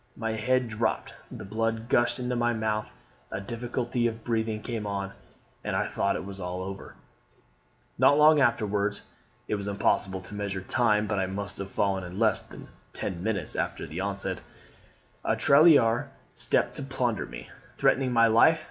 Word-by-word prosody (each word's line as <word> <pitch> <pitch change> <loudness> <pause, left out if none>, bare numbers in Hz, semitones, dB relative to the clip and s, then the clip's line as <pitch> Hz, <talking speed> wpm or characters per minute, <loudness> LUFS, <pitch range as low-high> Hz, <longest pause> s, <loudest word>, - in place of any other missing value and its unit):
My 115 -1 -2
head 125 +3 +1
dropped, 115 0 -2 0.2
the - - -8
blood 115 +2 -2
gushed 120 0 +2
into 125 -1 -2
my 120 0 +1
mouth, 110 -1 -2 0.4
a - - -4
difficulty 120 +3 -2
of 115 -1 -5
breathing 110 -2 -1
came 115 -4 -4
on, 100 -1 -3 0.5
and - - -2
I - - +1
thought - - 0
all - - -5
was 95 0 -8
over. 95 +2 -6 1.0
"Not 145 - +6
long 150 0 +7
afterwards 105 -4 +1 0.4
(it - - -2
was 100 -1 -2
impossible 95 -1 +1
to 90 - -8
measure 100 -2 -3
time, 105 +1 +2
but 100 -1 -1
I 95 - 0
must 100 +1 -5
have 100 0 -5
fallen 95 -1 0
in 90 +1 -8
less 110 0 +3
than - - -12 0.3
ten 85 -2 -4
minutes 100 -5 -2
after - - -2
the 80 +4 -6
onset), 100 0 -2 0.8
a - - +1
tirailleur 140 -4 +5 0.2
stopped - - +1
to - - -5
plunder 130 -5 -1
me, - - -9 0.3
threatening 130 -1 +2
my 115 -1 +5
life. 115 0 +5
110 Hz, 165 wpm, -27 LUFS, 100-120 Hz, 1.0 s, long